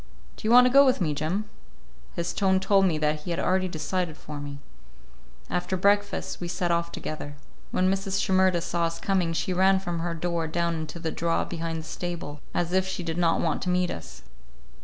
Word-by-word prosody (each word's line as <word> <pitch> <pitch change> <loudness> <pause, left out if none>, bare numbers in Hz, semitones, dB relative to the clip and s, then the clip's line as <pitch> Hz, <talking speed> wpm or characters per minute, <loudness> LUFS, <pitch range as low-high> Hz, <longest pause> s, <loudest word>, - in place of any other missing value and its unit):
Do - - -5
you - - +3
want 250 +1 +9
to 250 - +2
go 280 +1 +9
with 260 -2 +3
me, 160 -5 +1
Jim?" 165 +8 -1 0.7
His 170 0 -2
tone 190 -1 +2
told 195 0 +4
me 165 -4 +1
that 150 0 0
he 165 - -8
had 170 - -1
already 185 0 +1
decided 170 0 -2
for 150 -1 -8
me. 145 0 -6 0.9
After 180 +2 -1
breakfast 205 +1 +1
we 175 - -3
set 175 0 -1
off 170 0 0
together. 145 -1 -6 0.3
When 185 - +1
Mrs. 195 0 -1
Shimerda 185 -2 +3
saw 170 0 0
us 165 0 -3
coming, 185 -4 +1
she 185 +3 -1
ran 190 +1 +4
from 175 -3 -3
her 170 0 -2
door 170 -1 -1
down 170 +1 0
into 160 0 -5
the 165 -1 -3
draw 165 0 0
behind 165 -1 -4
the - - -11
stable, 170 -5 -5
as 175 0 -1
if 190 0 +2
she 190 -1 -4
did 165 0 -3
not 165 -1 +2
want 160 -3 0
to 185 - -2
meet 180 0 +1
us. 65 -6 -9
175 Hz, 210 wpm, -26 LUFS, 165-190 Hz, 0.9 s, want